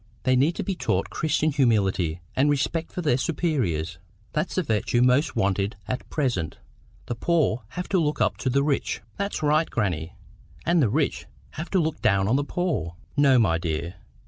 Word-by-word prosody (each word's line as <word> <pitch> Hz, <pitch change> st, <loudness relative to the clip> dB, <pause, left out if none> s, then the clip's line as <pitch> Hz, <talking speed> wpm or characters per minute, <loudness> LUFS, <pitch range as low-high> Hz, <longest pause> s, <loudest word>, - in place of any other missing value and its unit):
They 130 Hz, -, +3 dB
need 140 Hz, +7 st, +3 dB
to -, -, -3 dB
be 195 Hz, -, -1 dB
taught 180 Hz, -, -1 dB
Christian 155 Hz, 0 st, +1 dB
humility 95 Hz, -, +1 dB
and 140 Hz, +3 st, +3 dB
respect 155 Hz, +3 st, 0 dB
for 180 Hz, -, -4 dB
their 125 Hz, -6 st, +3 dB
superiors. 120 Hz, -, -1 dB, 0.3 s
That's 155 Hz, +4 st, -1 dB
the 185 Hz, -, +1 dB
virtue 120 Hz, 0 st, +1 dB
most 130 Hz, +5 st, +3 dB
wanted 100 Hz, +1 st, 0 dB
at 125 Hz, -, -4 dB
present. 120 Hz, -, -1 dB, 0.5 s
The -, -, -3 dB
poor 125 Hz, -4 st, +1 dB
have 180 Hz, -, -3 dB
to 190 Hz, -, +3 dB
look 150 Hz, -2 st, 0 dB
up -, -, +1 dB
to 130 Hz, -, -1 dB
the 140 Hz, +2 st, +2 dB
rich"— 145 Hz, -2 st, -1 dB, 0.2 s
"That's 200 Hz, -4 st, -2 dB
right, 155 Hz, +2 st, +3 dB
grannie! 90 Hz, -7 st, -2 dB, 0.5 s
And 170 Hz, -1 st, +3 dB
the 120 Hz, -, +3 dB
rich 140 Hz, +6 st, 0 dB, 0.2 s
have 160 Hz, +4 st, -6 dB
to 190 Hz, -, +2 dB
look 160 Hz, -2 st, -1 dB
down 100 Hz, -2 st, +3 dB
on 115 Hz, -, +3 dB
the 145 Hz, -, +2 dB
poor." 145 Hz, -, -2 dB, 0.2 s
"No, 140 Hz, -3 st, +5 dB
my 85 Hz, -8 st, +3 dB
dear. 85 Hz, +2 st, -3 dB
130 Hz, 185 wpm, -25 LUFS, 100-155 Hz, 0.5 s, No